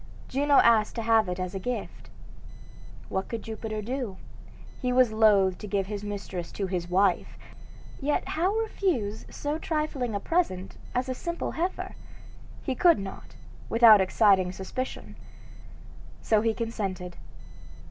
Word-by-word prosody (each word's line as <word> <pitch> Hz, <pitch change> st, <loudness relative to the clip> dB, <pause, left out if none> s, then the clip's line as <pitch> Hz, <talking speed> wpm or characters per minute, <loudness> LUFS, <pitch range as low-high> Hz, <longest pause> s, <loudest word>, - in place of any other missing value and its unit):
Juno 285 Hz, +2 st, +2 dB
asked 225 Hz, -4 st, +5 dB
to 230 Hz, -, -3 dB
have 220 Hz, -3 st, +3 dB
it 180 Hz, 0 st, -3 dB
as 185 Hz, 0 st, -3 dB
a 195 Hz, -, -3 dB
gift. 245 Hz, +5 st, -5 dB, 1.0 s
What 190 Hz, 0 st, -2 dB
could 230 Hz, -2 st, -4 dB
Jupiter 220 Hz, -1 st, -5 dB
do? 240 Hz, -4 st, -4 dB, 0.6 s
He 250 Hz, -2 st, 0 dB
was 250 Hz, -2 st, +4 dB
loath 205 Hz, -4 st, +4 dB
to 210 Hz, -, -7 dB
give 195 Hz, -1 st, 0 dB
his 205 Hz, +1 st, -5 dB
mistress 200 Hz, -4 st, -5 dB
to 200 Hz, -, -2 dB
his 180 Hz, -2 st, -3 dB
wife; 190 Hz, +3 st, +1 dB, 0.6 s
yet 290 Hz, +1 st, -1 dB
how 350 Hz, +5 st, +1 dB
refuse 360 Hz, -, -1 dB
so 295 Hz, +2 st, -3 dB
trifling 305 Hz, -8 st, -2 dB
a -, -, 0 dB
present 195 Hz, -, -1 dB, 0.2 s
as 250 Hz, +1 st, 0 dB
a 260 Hz, -, -1 dB
simple 340 Hz, +6 st, -4 dB
heifer? 355 Hz, +4 st, -3 dB, 0.7 s
He 265 Hz, -, -1 dB
could 340 Hz, +6 st, +5 dB
not, 195 Hz, -1 st, -8 dB, 0.3 s
without 225 Hz, -3 st, +7 dB
exciting 190 Hz, -1 st, +3 dB
suspicion; 195 Hz, +8 st, -6 dB, 1.0 s
so 215 Hz, -2 st, +2 dB
he 225 Hz, 0 st, +1 dB
consented. 195 Hz, -6 st, -4 dB
220 Hz, 140 wpm, -27 LUFS, 195-255 Hz, 1.0 s, without